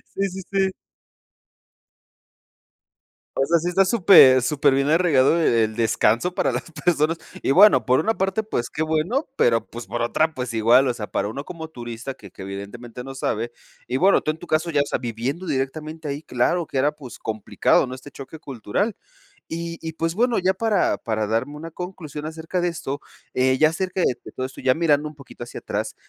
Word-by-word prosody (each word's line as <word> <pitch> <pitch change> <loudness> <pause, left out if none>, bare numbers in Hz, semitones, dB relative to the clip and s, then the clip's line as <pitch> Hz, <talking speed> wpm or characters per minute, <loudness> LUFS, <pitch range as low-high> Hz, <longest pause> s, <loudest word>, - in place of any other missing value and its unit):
Sí, 195 0 +1
sí, 190 +1 -7
sí. 195 -1 +2 2.7
O 135 - +3
sea, 170 +2 +3
sí 175 - -2
está 190 +2 +3
súper 175 - +7
superbién 140 +1 +2
arraigado 160 -2 +4
el 115 -7 +2
descanso 115 +7 +2
para - - +1
las - - -4
personas, 165 -1 +1 0.2
y - - +1
bueno, 140 - +6
por 130 0 +3
una 225 +1 +1
parte, 195 +3 0
pues, 120 - -3
qué 155 - -2
bueno, 160 - 0
pero, 115 -1 +3
pues, 120 0 -9
por 120 - -3
otra, 155 +7 +1
pues, 125 -4 -4
igual, 120 +4 +4
o 125 - 0
sea, 105 -3 -6
para 100 +1 -2
uno 140 +6 -6
como 160 -3 -8
turista 120 -1 -7
que 105 -7 -14
que - - -13
evidentemente 105 +6 -8
no 135 0 -8
sabe, 120 -2 -2 0.3
y 125 - -2
bueno, 190 +7 +5
tú 155 - 0
en 155 - -8
tu 175 - -11
caso 160 +2 +1
ya, 145 -3 +2
o - - 0
sea, - - -2
viviendo 125 +9 -3
directamente 155 +2 -3
ahí, 145 +3 -4
claro 160 +7 0
que - - -4
era, 140 +3 +3
pues, 145 -5 -11
complicado, 110 +3 +1
¿no?, 130 - -6
este 130 +2 -12
choque 135 +4 -10
cultural. 140 - -3 0.5
Y 170 0 -5
y, 160 -1 -5
pues, 165 +1 -1
bueno, 240 +1 +2
ya 185 +1 +2
para 210 -1 +1
para 110 -2 -2
darme 115 +7 -1
una 165 +2 -8
conclusión 160 -4 -7
acerca 160 +3 -4
de 175 - +1
esto, 145 -4 -5 0.3
eh, 130 0 +2
ya 155 +2 +5
acerca 185 +2 -2
de - - +4 0.2
de - - -10
todo 130 - -3
esto, 130 - -9
ya 130 -1 +4
mirando 150 -3 +2
un 150 - -14
poquito 140 -3 -11
hacia - - -8
atrás, - - -4
145 Hz, 200 wpm, -23 LUFS, 125-170 Hz, 2.7 s, súper